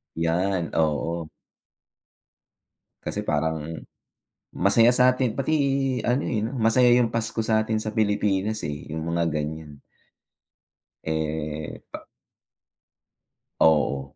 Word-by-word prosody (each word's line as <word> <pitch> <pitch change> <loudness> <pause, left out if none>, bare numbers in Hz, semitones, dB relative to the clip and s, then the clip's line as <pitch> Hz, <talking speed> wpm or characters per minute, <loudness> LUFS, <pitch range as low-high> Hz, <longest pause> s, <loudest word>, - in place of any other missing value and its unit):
Yan, 85 +3 0
oo. 80 +1 -1 1.7
Kasi - - -3
parang 80 +1 -1 0.9
masaya 115 +5 +4
sa 125 +1 +5
'tin 125 -2 -2
pati 135 +4 0 0.5
ano, 125 +5 +1
eh, 105 -3 -1
'no, 125 +4 -3
masaya 120 +2 +4
yung 115 -2 0
Pasko 115 0 -2
sa 110 -1 +3
'tin 110 0 -1
sa 110 0 -4
Pilipinas, 105 0 0
eh, 75 +1 -7
yung 80 +1 -4
mga 85 0 0
ganyan. 75 -1 -5 1.2
Eh, 80 -1 -3
pa - - -9 1.5
Oo, 70 -3 +2
90 Hz, 105 wpm, -24 LUFS, 80-110 Hz, 1.7 s, sa